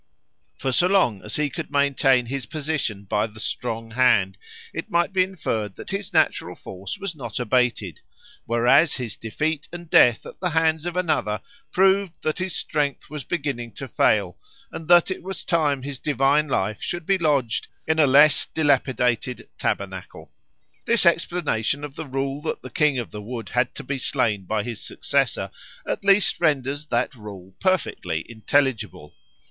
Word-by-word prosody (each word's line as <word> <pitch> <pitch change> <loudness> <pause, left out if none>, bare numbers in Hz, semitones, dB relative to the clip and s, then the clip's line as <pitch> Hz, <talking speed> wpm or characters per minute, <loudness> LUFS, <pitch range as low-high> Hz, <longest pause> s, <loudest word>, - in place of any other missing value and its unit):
For 135 - -1
so 175 +8 +4
long 180 - +2
as 105 - -5
he 150 -2 0
could 170 -3 -5
maintain 140 -3 +3
his 130 -1 -4
position 145 -9 -2
by 105 +2 0
the 110 0 -14
strong 115 0 -4
hand, 110 -6 +3 0.4
it - - -5
might 170 +2 +1
be 190 - +3
inferred 115 - -3
that - - -9
his 200 0 -3
natural - - +1
force 95 0 -8
was 195 -4 -5
not 120 -6 -5
abated; 120 -7 0 0.5
whereas 120 +7 +4
his 120 -5 -5
defeat 150 +7 -3
and 175 0 -8
death 120 -2 +5
at - - -11
the 180 - 0
hands 160 0 +1
of 175 +1 -4
another 105 - 0 0.3
proved 190 -1 +2
that 155 - -1
his 185 -1 -2
strength 145 -2 -2
was 150 -3 -5
beginning 135 - -3
to 135 - -7
fail 100 -6 +1 0.3
and 160 - -8
that 175 +1 +6
it 185 - -4
was 190 +1 -6
time 150 -6 +1
his 140 -2 -5
divine 145 +1 +2
life 105 -6 -1
should 175 -2 -4
be 195 +1 +2
lodged 140 -8 +1 0.2
in 160 0 +1
a 150 - +6
less 145 +2 +6
dilapidated 130 -5 0
tabernacle. - - -4 0.5
This 230 -4 +3
explanation 165 -6 +1
of 145 -2 -7
the 160 - -6
rule 135 +2 -2
that 160 - -4
the 130 - -9
King 150 +1 +2
of 120 - -4
the 105 - -7
Wood 115 +2 -6
had 125 0 0
to - - -7
be 140 +1 -3
slain 105 -5 0
by 105 +2 -1
his 115 -1 -6
successor - - -1 0.4
at - - -2
least 200 -2 +3
renders 145 -2 0
that 120 -1 0
rule 100 -5 -11
perfectly 110 - -1
intelligible. 115 - -1
135 Hz, 170 wpm, -23 LUFS, 115-160 Hz, 0.5 s, that